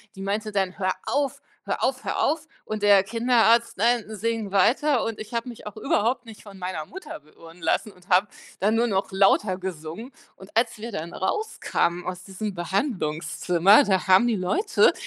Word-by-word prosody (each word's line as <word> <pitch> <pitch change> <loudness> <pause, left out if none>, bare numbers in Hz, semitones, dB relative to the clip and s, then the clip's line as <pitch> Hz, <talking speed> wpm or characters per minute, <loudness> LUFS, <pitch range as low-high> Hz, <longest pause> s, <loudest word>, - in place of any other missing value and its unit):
Die 195 - -9
meinte 210 +2 -2
dann: 190 -2 -1
„Hör 185 -1 0
auf, 280 -2 -1 0.2
hör - - -2
auf, 260 +1 0
hör - - -1
auf.“ 310 +1 0 0.2
Und 215 -1 -5
der 200 -2 +6
Kinderarzt: 235 +1 +3
„Nein, 235 +2 +2
sing 220 -1 -3
weiter.“ 250 +7 +3
Und 225 -1 -4
ich 215 +2 -8
habe 235 +1 -2
mich 235 -3 -10
auch 210 - -8
überhaupt 235 +3 0
nicht 220 -2 -12
von 200 -2 -12
meiner 180 -4 -4
Mutter 380 - -9
beirren 165 +3 -17
lassen 165 +6 0
und 180 -1 -22
habe 190 +1 +3 0.3
dann 210 +3 +2
nur 235 +1 +2
noch 195 -2 -1
lauter 195 0 +3
gesungen. 185 - -7 0.2
Und 190 - -13
als 230 0 +1
wir 225 +1 -7
dann 165 -1 -5
rauskamen 190 - -1
aus 180 0 -5
diesem 200 +2 -5
Behandlungszimmer, 180 - +2
da 190 -4 0
haben 190 +5 +6
die 225 -4 +1
Leute 360 - +2
205 Hz, 185 wpm, -25 LUFS, 185-235 Hz, 0.3 s, der